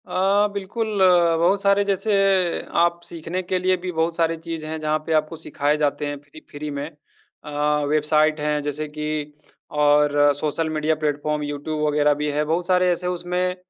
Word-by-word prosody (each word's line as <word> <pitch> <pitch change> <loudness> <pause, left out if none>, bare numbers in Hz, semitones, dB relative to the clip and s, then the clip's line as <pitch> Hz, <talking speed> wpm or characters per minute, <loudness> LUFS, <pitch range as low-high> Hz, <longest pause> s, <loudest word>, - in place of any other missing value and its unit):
अ, 195 +3 +2
बिल्कुल 205 +1 -3
अ, 175 -3 +5
बहुत 185 +4 +2
सारे 200 0 +3
जैसे 200 +2 0 0.7
आप 170 0 +1
सीखने 170 +2 -5
के 185 0 -2
लिए 185 +1 +2
भी 180 +1 -5
बहुत 165 0 -1
सारी 165 -1 +1
चीज़ 165 -1 -6
हैं, 160 +1 -5
जहाँ 155 0 0
पे 160 - -1
आपको 155 +1 0
सिखाए 150 -2 -1
जाते 150 -1 -1
हैं 145 0 -4
फ़्री 145 +2 -15
फ़्री 150 +1 -6
में। 140 +1 -4 0.6
अ, 150 - -8 0.4
वेबसाइट 155 +1 +2
हैं 150 0 0
जैसे 150 +1 -3
कि 150 0 -4 0.5
और 145 0 +4
सोशल 155 +2 -2
मीडिया 155 0 0
प्लेटफ़ॉर्म 150 0 -1
यूट्यूब 145 +1 -4
वगैरह 150 0 +3
भी 150 - 0
है। 150 +1 0
बहुत 165 +3 -1
सारे 180 -1 +3
ऐसे 180 +1 -2
उसमें 180 +1 -1
155 Hz, 180 wpm, -22 LUFS, 150-180 Hz, 0.7 s, अ